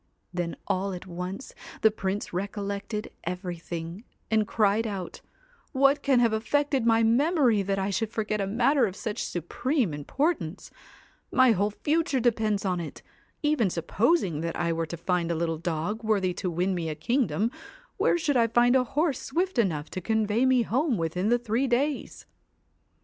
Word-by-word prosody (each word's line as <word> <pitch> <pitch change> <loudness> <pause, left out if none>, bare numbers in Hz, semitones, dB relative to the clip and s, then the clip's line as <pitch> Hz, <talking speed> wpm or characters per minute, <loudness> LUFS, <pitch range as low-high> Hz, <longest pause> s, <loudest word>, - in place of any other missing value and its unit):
Then 175 -1 -2
all 190 +1 -1
at 180 - -7
once 180 +7 -6 0.3
the 220 - +6
Prince 200 -2 -3
recollected 200 +2 -4
everything, 175 0 -5 0.3
and 215 -1 +3
cried 215 +1 +2
out 195 -4 -5 0.3
* - - -34
What 275 +1 +4
can 270 -3 +3
have 230 -2 +3
affected 270 +2 +1
my 225 0 +4
memory 250 - +3
that 195 0 -1
I 195 +1 -1
should 225 +2 -1
forget 215 -2 -1
a 195 - -1
matter 240 +4 +3
of 190 - -6
such 215 -1 -3
supreme 210 - -1
importance! 175 - -2 0.6
My 255 -1 +5
whole 205 0 +2
future 295 +5 0
depends 220 -4 +1
on 180 -2 0
it. 165 - -7 0.4
Even 295 -9 +2
supposing 185 - +1
that 165 0 -3
I 170 -1 0
were 165 0 -2
to 170 - -6
find 175 0 0
a 170 - 0
little 165 -1 -1
dog 175 +6 -2
worthy 200 -4 +1
to 180 +1 -3
win 180 +3 0
me 170 -3 -2
a 155 - -3
kingdom, 235 - 0 0.5
where - - +3
should 295 -4 0
I 230 -2 +4
find 240 +2 +4
a 260 - +5
horse 285 +3 0
swift 355 +1 -1
enough 160 -8 0
to 185 - -4
convey 220 +4 +1
me 255 -2 +4
home 255 +2 +1
within 180 +4 -1
the 240 - +4
three 240 +3 0
days 275 +4 -1
210 Hz, 170 wpm, -27 LUFS, 180-245 Hz, 0.6 s, the